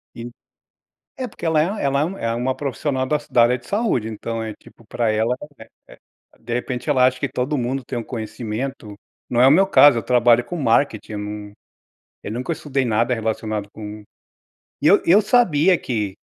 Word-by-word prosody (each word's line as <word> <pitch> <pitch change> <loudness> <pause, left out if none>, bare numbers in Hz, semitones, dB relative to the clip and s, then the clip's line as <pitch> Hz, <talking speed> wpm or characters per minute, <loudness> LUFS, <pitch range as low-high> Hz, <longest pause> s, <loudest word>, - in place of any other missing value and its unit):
e, 120 +1 -7 0.9
é 260 - -4
porque 205 - -11
ela 160 -1 +3
é 190 +5 -1
ela 140 0 +1
é 150 - +2
um 195 +4 -5
é 115 0 -2
uma 125 +2 -1
profissional 135 -1 -2
da 150 +2 +1
da 120 - +5
área 125 +2 +3
de 120 - -19
saúde, 200 - 0
então 115 +1 -5
é 110 -1 -5
tipo 115 - -20
pra 115 0 -1
ela, 110 +3 0 0.5
eh - - -14
eh - - -21 0.4
de 120 - -5
repente, 125 +2 -4
ela 130 -3 +4
acha 130 0 0
que 135 - -2
todo 130 +3 -2
mundo 130 +2 -2
tem 120 0 -4
um - - -3
conhecimento 110 0 -5 0.4
Não 120 - +1
é 125 - +7
o - - +7
meu 190 +7 +5
caso, 140 -7 +6
eu - - -3
trabalho 120 -1 +3
com 175 - -6
marketing, 115 -5 0
eu 105 - -4
não, 105 0 -6 0.7
eu 105 - -6
nunca 125 +8 -3
estudei 140 -4 -2
nada 115 +1 +1
relacionado 110 -2 -3
com 105 0 -8 0.8
E - - +3
eu - - +6
eu 190 +5 +6
sabia 190 -6 +3
que 105 -9 -3
125 Hz, 205 wpm, -21 LUFS, 115-145 Hz, 0.9 s, é